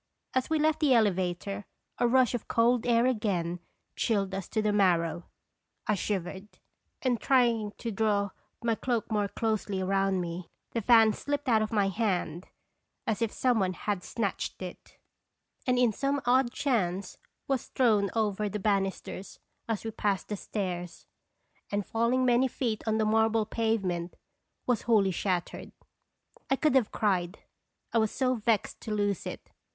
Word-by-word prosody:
As 260 -1 0
we 320 - +2
left 310 0 +2
the 290 -5 +4
elevator, 195 -1 0 0.4
a 240 - +4
rush 255 0 +4
of 245 - -3
cold 235 +1 +2
air 235 0 +4
again 190 -8 0 0.4
chilled 200 -4 0
us 195 -1 -4
to 220 - -1
the 210 -1 +1
marrow. 175 -4 +2 0.6
I 215 - +2
shivered, 190 0 -3 0.6
and 245 -4 +1
trying 235 -5 +2
to 230 - -4
draw 205 -1 +1 0.3
my 230 -1 +2
cloak 235 0 -2
more 210 -2 +1
closely 205 -3 -1
round 195 0 +1
me, 175 0 -5 0.2
the 230 - -1
fan 225 -1 +6
slipped 290 +3 -3
out 225 -3 +4
of 215 - -1
my 205 -3 +2
hand 185 -5 -1 0.6
as 220 0 -1
if 230 -2 +1
some 250 -3 +2
one 185 -1 +1
had 200 0 -3
snatched 210 -5 -3
it, 180 - -10 0.7
and 250 0 +3
in 245 -3 +3
some 280 +5 0
odd 250 0 +3
chance 200 - -1 0.3
was 270 -3 -1
thrown 215 -6 +2
over 210 -2 0
the 210 - -3
banisters 195 -1 -2 0.3
as 220 -3 -1
we 225 - -2
passed 205 -3 -1
the 210 - -1
stairs, 180 -4 -4 0.7
and 205 -1 -1
falling 235 +3 +1
many 250 +1 +4
feet 235 -4 -2
on 220 0 +2
the 220 - +2
marble 220 0 +3
pavement, 195 -7 -1 0.5
was 245 -3 +1
wholly 210 -4 +3
shattered. 180 -1 -2 0.8
I 270 - +4
could 305 0 +2
have 260 -5 +3
cried, 185 -2 0 0.6
I 230 - +4
was 220 -1 +2
so 255 +2 +1
vexed 225 -3 0
to 220 - -6
lose 205 -3 0
it. - - -8
215 Hz, 160 wpm, -29 LUFS, 195-235 Hz, 0.8 s, fan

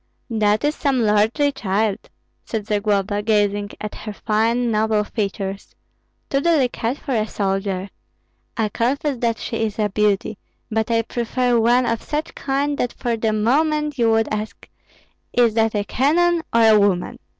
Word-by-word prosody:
"That 215 0 +2
is 295 +1 +2
some 270 -6 0
lordly 220 +7 +2
child," 205 -3 -1 0.3
said 220 -3 -4
Zagloba, 205 -1 0
gazing 205 -1 +1
at 215 - -5
her 215 - -7
fine, 230 +3 0
noble 215 0 +1
features, 200 -2 -4 0.5
"too 275 - 0
delicate 270 -6 +1
for 280 - -7
a 215 -2 0
soldier. 195 -2 -2 0.7
I 220 -2 +1
confess 270 +5 -1
that 230 -1 0
she 230 - -4
is 220 -2 -2
a 210 -1 +1
beauty, 210 +1 0 0.3
but 220 +1 0
I 230 0 +2
prefer 240 +1 0
one 240 +2 +3
of 230 -1 -1
such 300 +1 -4
kind 280 +1 -1
that 245 - -1
for 240 -2 -2
the 220 -1 0
moment 295 +6 +1
you 230 -1 +3
would 225 0 +2
ask, 215 0 -5 0.7
'Is 235 -3 +3
that 225 0 +1
a 205 - +1
cannon 330 +10 +2
or 230 0 +4
a 220 -1 +6
woman?'" 195 -3 0
225 Hz, 160 wpm, -21 LUFS, 210-250 Hz, 0.7 s, a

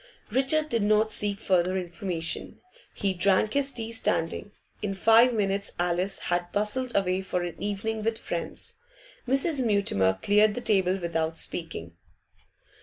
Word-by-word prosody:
Richard 275 +5 +2
did 230 -5 +1
not 215 +1 +3
seek 205 -2 0
further 185 -2 +1
information. 175 -2 -4 0.4
He 195 -1 0
drank 195 +3 +2
his 280 -1 +1
tea 230 -3 -4
standing. 205 -2 -1 0.3
In 195 -2 -2
five 225 +5 +6
minutes 200 -3 -1
Alice 180 +2 0 0.2
had 175 0 -1
bustled 235 +5 0
away 190 -1 +1
for 180 -2 -2
an 175 -2 -6
evening 210 +2 -2
with 225 +1 -1
friends. - - -5 0.5
Mrs. 275 +2 +2
Mutimer 145 - +2
cleared 210 +1 +4
the 245 - -3
table 190 -4 +2
without 165 -2 -2
speaking. 85 - -5
200 Hz, 140 wpm, -27 LUFS, 180-225 Hz, 0.5 s, five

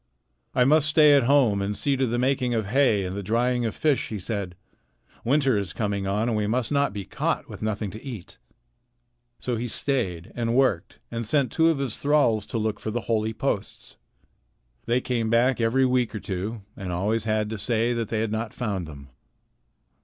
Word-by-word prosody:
"I 125 - +5
must 155 +3 +4
stay 155 -1 +6
at 140 -4 +4
home 125 -7 +4
and 100 +1 -2
see 140 -1 +1
to 130 -1 +1
the 120 +1 -1
making 125 -1 +1
of 110 -2 0
hay 110 -3 +2
and 90 +1 -4
the 100 - -3
drying 120 +4 +1
of 110 - -5
fish," 150 -4 +1
he 110 - -4
said. 100 -2 -4 0.7
"Winter 135 0 +2
is 100 -4 -2
coming 100 -3 -2
on, 105 +4 0
and 115 - 0
we 105 -1 0
must 120 +3 0
not 140 -3 +2
be 100 -1 -6
caught - - -2
with - - -10
nothing 105 -2 -2
to 110 - -10
eat." 120 -10 -8 1.0
So 125 -2 -2
he 120 +2 -3
stayed 100 - -1
and 115 0 -1
worked 125 -10 +1
and 115 -1 -4
sent 135 -1 +1
two 165 0 +3
of 160 - +1
his 135 -5 -3
thralls 140 -8 +2
to - - -3
look 110 -1 -1
for - - -4
the 120 +2 -2
holy 110 -1 0
posts. 110 -4 -4 0.9
They 120 +2 +2
came 115 -3 -1
back 120 +2 +3
every 125 +4 +3
week 125 -3 +1
or - - -3
two 100 +3 -4
and 95 -3 -5
always 105 +6 -1
had 110 -1 0
to 110 - -4
say 115 +3 +1
that 115 -2 -2
they 110 0 -1
had 110 -1 -1
not 110 0 -3
found 100 -8 -3
them. 70 -3 -11
115 Hz, 205 wpm, -25 LUFS, 105-130 Hz, 1.0 s, stay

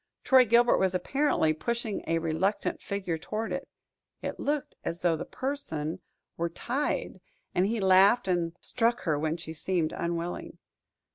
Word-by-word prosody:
Troy 260 -1 +6
Gilbert 235 +2 +5
was 190 -1 +2
apparently 185 - +2
pushing 230 +5 -2
a 165 - +2
reluctant 165 +5 -1
figure 185 -5 -3
toward 220 +6 -3
it - - -4 0.5
it - - -4
looked 290 -1 -1
as 170 +1 -4
though 175 -2 +3
the 160 - -5
person 185 - -3 0.4
were 170 0 0
tied, 255 - -2 0.3
and 180 +2 +2
he 225 +1 -1
laughed 195 +4 +5
and 175 -2 0
struck 235 0 0
her 155 -4 0
when 160 +2 -1
she 165 -1 -7
seemed 165 -1 -1
unwilling. 170 +1 -3
185 Hz, 150 wpm, -29 LUFS, 165-235 Hz, 0.5 s, Troy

